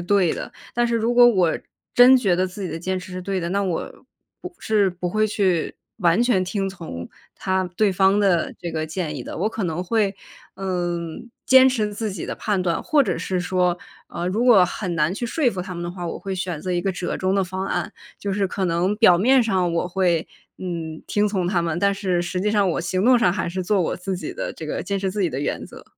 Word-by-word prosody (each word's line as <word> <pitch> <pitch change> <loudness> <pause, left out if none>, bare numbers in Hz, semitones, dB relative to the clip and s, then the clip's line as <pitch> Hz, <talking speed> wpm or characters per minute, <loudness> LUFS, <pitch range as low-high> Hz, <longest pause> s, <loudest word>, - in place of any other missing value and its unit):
对 180 -1 +2
的。 - - -6 0.2
但 240 0 +1
是 235 - -1
如 230 +1 +1
果 245 0 +7
我 185 -8 +3 0.3
真 250 +2 +8
觉 195 -8 +2
得 185 +1 +1
自 195 +2 -8
己 185 - -3
的 165 - -5
坚 185 +2 -2
持 185 0 -7
是 185 - -5
对 190 0 -2
的， 170 - -3
那 200 +2 0
我 180 -4 -3 0.5
不 360 - -8
是 210 -3 +2
不 180 -1 -4
会 215 +2 +2
去 190 -6 0 0.2
完 175 +2 +3
全 210 -7 +2
听 195 +1 -2
从 165 - -7 0.3
他 190 0 -1
对 210 -2 +3
方 195 +2 +3
的 185 -5 +2
这 170 - -4
个 155 -1 -3
建 155 -2 -4
议 125 - -6
的， - - -7
我 205 +6 0
可 220 -2 -4
能 170 +1 -2
会， 205 0 0 0.4
嗯， 175 0 -3 0.2
坚 260 0 +7
持 215 -5 -1
自 210 0 -3
己 - - -5
的 - - -4
判 200 -4 -1
断， 170 -2 0
或 305 -4 +3
者 255 - -1
是 185 +1 -2
说 180 -1 +1 0.3
呃， 175 +1 -3
如 220 +6 0
果 220 -7 +7
很 180 0 -4
难 155 +2 +1
去 240 +4 -3
说 260 +1 +1
服 185 -3 -5
他 180 0 -6
们 170 - -5
的 175 - -4
话， 175 -1 -6
我 - - -4
会 195 -1 -5
选 175 -4 -3
择 185 - -4
一 175 - +1
个 195 +1 -1
折 180 0 -3
中 190 +1 0
的 195 - +2
方 190 +1 -4
案， 210 - -2 0.3
就 200 -1 -3
是 200 0 +1
可 190 +1 -3
能 180 +3 +1
表 185 -6 +6
面 255 +6 +5
上 185 -6 +1
我 170 +1 -1
会， 180 -3 +1 0.3
嗯， 165 -3 -5
听 210 0 +2
从 190 -4 -1
他 180 -3 +1
们， 165 -1 -1
但 200 +1 +3
是 185 -3 -1
实 180 +1 -3
际 210 +2 +1
上 200 -4 +3
我 - - -1
行 185 +3 -1
动 250 +1 +6
上 180 -7 +3
还 185 -3 -2
是 185 +2 -3
做 200 +1 +2
我 170 - -1
自 185 +1 -4
己 180 - -5
的 - - -4
这 - - -8
个 - - -3
坚 200 - -2
持 190 -1 -1
自 205 +1 -3
己 175 - +2
的 135 -3 -4
原 145 - -2
则。 - - -13
185 Hz, 270 characters per minute, -22 LUFS, 175-205 Hz, 0.5 s, 真